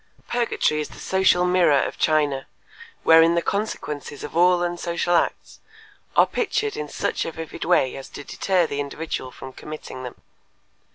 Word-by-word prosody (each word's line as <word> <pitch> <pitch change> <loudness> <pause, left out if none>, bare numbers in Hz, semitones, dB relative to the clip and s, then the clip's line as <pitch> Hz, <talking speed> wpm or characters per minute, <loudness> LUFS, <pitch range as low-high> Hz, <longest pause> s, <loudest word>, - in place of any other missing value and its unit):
Purgatory 235 -10 0
is 150 - -5
the - - -13
social 190 -2 +3
mirror 180 -6 +4
of - - -2
China, 145 -4 +1 0.6
wherein 165 +1 +6
the 170 - +2
consequences 150 -8 -3
of 150 - -7
all 175 +1 +4
unsocial 175 0 -1
acts - - -1 0.6
are - - +7
pictured 430 -2 -1
in 445 - -5
such - - -2
a - - -4
vivid 160 -1 -7
way 165 -7 +3
as 135 - -8
to 145 - -9
deter 185 +3 +1
the 145 -2 -4
individual 145 -1 -4
from 130 +1 -10
committing 150 -3 -8
them. 125 -1 -8
165 Hz, 160 wpm, -23 LUFS, 145-180 Hz, 0.6 s, are